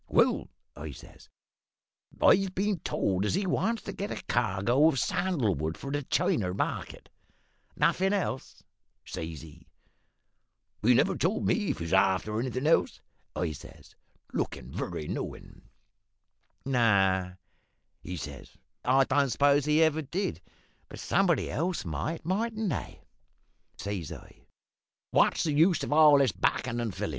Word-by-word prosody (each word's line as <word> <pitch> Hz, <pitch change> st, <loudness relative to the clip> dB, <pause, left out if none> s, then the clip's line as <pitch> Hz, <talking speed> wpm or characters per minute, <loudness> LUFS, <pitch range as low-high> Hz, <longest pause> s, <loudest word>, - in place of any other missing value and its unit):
"`Well,' -, -, +2 dB, 0.3 s
I 75 Hz, +1 st, -7 dB
says, -, -, -15 dB, 0.9 s
`I've 190 Hz, -1 st, +4 dB
been 200 Hz, -1 st, 0 dB
told 95 Hz, -8 st, -1 dB
as 105 Hz, -, 0 dB
he 195 Hz, +1 st, 0 dB
wants 210 Hz, +6 st, 0 dB
to -, -, -6 dB
get 200 Hz, +2 st, -4 dB
a -, -, -6 dB
cargo 120 Hz, +4 st, +2 dB
of 160 Hz, -, +2 dB
sandal 140 Hz, -, 0 dB
wood 80 Hz, +1 st, -3 dB
for 140 Hz, -, -6 dB
the 145 Hz, 0 st, -1 dB
China 95 Hz, -8 st, 0 dB
market.' -, -, -4 dB, 0.7 s
"`Nothin' 190 Hz, +1 st, +2 dB
else?' 190 Hz, -10 st, -3 dB, 0.4 s
says 80 Hz, -2 st, -6 dB
he. 80 Hz, +1 st, -15 dB, 1.2 s
"`He 120 Hz, +3 st, +5 dB
never -, -, +3 dB
told 185 Hz, +6 st, 0 dB
me -, -, +3 dB, 0.2 s
as -, -, -1 dB
he 85 Hz, -, -5 dB
was 85 Hz, -, -4 dB
after 95 Hz, +3 st, +2 dB
anythin' 130 Hz, +2 st, -2 dB
else,' 160 Hz, -, +2 dB, 0.4 s
I 85 Hz, -3 st, -1 dB
says, 75 Hz, -, -13 dB, 0.4 s
lookin' 60 Hz, +1 st, -3 dB
very 75 Hz, -, -4 dB
knowin'. -, -, -7 dB, 1.0 s
"`No,' 95 Hz, -8 st, +2 dB, 0.6 s
he 90 Hz, -, -6 dB
says, 70 Hz, -4 st, -9 dB, 0.3 s
`I 135 Hz, +1 st, +3 dB
don't 140 Hz, 0 st, +2 dB
suppose 140 Hz, +2 st, +3 dB
he 150 Hz, +2 st, +4 dB
ever 160 Hz, 0 st, +2 dB
did; 180 Hz, +7 st, -3 dB, 0.5 s
but -, -, -9 dB
somebody 190 Hz, -4 st, +1 dB
else 170 Hz, -, -2 dB
might, 85 Hz, -, -4 dB
mightn't 215 Hz, +2 st, -1 dB
they?' -, -, -5 dB, 0.7 s
"Says 100 Hz, -6 st, -4 dB
I, -, -, -12 dB, 0.7 s
`What's -, -, +3 dB
the 155 Hz, -, 0 dB
use 165 Hz, +2 st, +3 dB
of -, -, -1 dB
all 150 Hz, -2 st, +7 dB
this 135 Hz, -5 st, +3 dB
backin' 115 Hz, +6 st, -1 dB
and 115 Hz, -2 st, -2 dB
fillin'? -, -, -4 dB
130 Hz, 145 wpm, -29 LUFS, -, 1.2 s, all